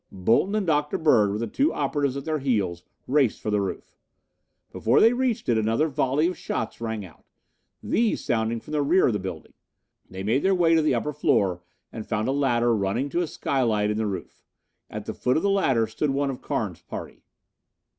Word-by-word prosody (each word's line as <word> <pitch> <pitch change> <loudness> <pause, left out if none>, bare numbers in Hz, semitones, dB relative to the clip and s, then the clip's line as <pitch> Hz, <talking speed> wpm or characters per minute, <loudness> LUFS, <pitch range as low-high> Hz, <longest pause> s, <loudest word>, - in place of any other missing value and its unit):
Bolton 115 - +1
and 210 -2 0
Dr. 150 -3 +1
Bird, 120 -10 +4
with 105 +2 -3
the - - 0
two 285 - +1
operatives 140 -3 -1
at 140 - -6
their 155 -1 -1
heels, 100 -10 -1 0.2
raced 135 -4 +2
for 105 - -3
the 105 -1 +2
roof. 95 - -5 0.8
Before 115 +3 +2
they 230 +2 +6
reached 250 -2 -1
it 115 -2 +3
another 115 +9 +1
volley 145 +1 +1
of 180 +1 0
shots 115 -6 -4
rang 110 -3 -3
out, 85 - -17 0.6
these 230 -1 0
sounding 115 0 0
from 115 - -13
the 150 -1 +1
rear 170 +7 +3
of 120 - +2
the 105 - -1
building. 95 -4 -7 0.6
They 95 +1 -7
made 115 +7 +1
their 195 0 +3
way 170 -2 +3
to 165 - +4
the 155 - +2
upper 150 - -2
floor 100 -11 +1 0.3
and 110 -2 -7
found 110 -1 -1
a - - +1
ladder 120 -4 +2
running 110 +7 -1
to 175 - 0
a 175 - -1
skylight 110 -9 0
in 105 - -2
the 110 -1 0
roof. 95 -3 -6 0.5
At - - -7
the - - -4
foot 125 - 0
of - - -1
the 200 - +2
ladder 135 - +2
stood 125 +7 -2
one 140 0 0
of 125 - -8
Carnes' - - -3
party. - - -8
125 Hz, 210 wpm, -25 LUFS, 110-150 Hz, 0.8 s, they